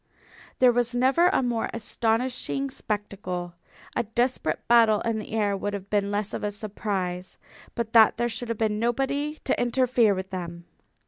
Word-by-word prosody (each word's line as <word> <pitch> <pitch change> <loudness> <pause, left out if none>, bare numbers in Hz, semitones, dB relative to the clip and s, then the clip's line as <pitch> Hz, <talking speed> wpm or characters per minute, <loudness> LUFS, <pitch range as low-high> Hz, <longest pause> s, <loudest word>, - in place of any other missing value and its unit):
There 255 -1 +6
was 240 0 0
never 265 +8 +4
a 360 - +2
more 240 -2 -1
astonishing 245 +4 -1
spectacle. 190 -6 -4 0.4
A - - +2
desperate 240 +3 -1
battle 230 -3 +5
in 230 -1 -1
the 215 - -8
air 205 -2 +1
would 205 +1 -3
have 200 0 -8
been 200 -1 +1
less 205 0 -2
of - - -4
a 210 - -1
surprise. 195 -3 -4 0.4
But 230 -1 -3
that 225 -1 +6
there 240 +1 +1
should 235 +1 -5
have 230 - -2
been 215 -1 0
nobody 275 +6 -1
to 260 - 0
interfere 245 -3 +3
with 190 0 -6
them! 170 -2 -6
225 Hz, 170 wpm, -26 LUFS, 205-245 Hz, 0.4 s, There